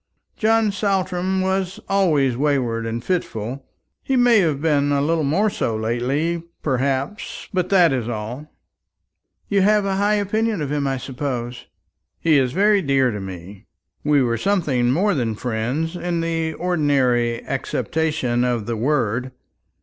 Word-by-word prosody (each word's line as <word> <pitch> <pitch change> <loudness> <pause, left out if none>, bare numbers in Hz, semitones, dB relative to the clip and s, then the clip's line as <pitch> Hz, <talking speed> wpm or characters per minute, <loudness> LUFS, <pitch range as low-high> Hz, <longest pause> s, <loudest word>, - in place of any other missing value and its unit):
John 220 -1 +2
Saltram 190 -2 0
was 190 0 -1
always 155 -10 +2
wayward 125 -5 0
and 115 +1 -4
fitful. 130 - -3 0.3
He 270 - -1
may 245 -3 +5
have 155 -7 +1
been 145 -2 +1
a 140 - +2
little 160 +2 +1
more 195 +10 +2
so 115 - -1
lately, 130 +10 -1 0.2
perhaps, 135 +7 -2
but 185 -1 0
that 175 -6 +5
is 120 -3 -2
all." 120 +7 -6 1.0
"You 200 -1 +2
have 210 +1 +4
a - - 0
very 190 - 0
high 205 +1 +2
opinion 215 +1 0
of 145 -2 -3
him, 145 -1 0
I 135 -1 -1
suppose?" 125 -2 -5 0.5
"He 155 -3 +4
is 130 -2 +1
very 205 +5 +3
dear 135 -4 +2
to 105 - -4
me. 95 +1 -9 0.4
We 145 -2 +3
were 115 -1 0
something 155 -12 +1
more 195 +9 +2
than 120 -7 -1
friends 125 +9 -2
in 175 -1 -2
the 165 -1 -1
ordinary 135 -9 +1
acceptation 135 -2 -1
of 120 -4 0
the 115 - -2
word. 125 -1 0
145 Hz, 150 wpm, -21 LUFS, 125-185 Hz, 1.0 s, may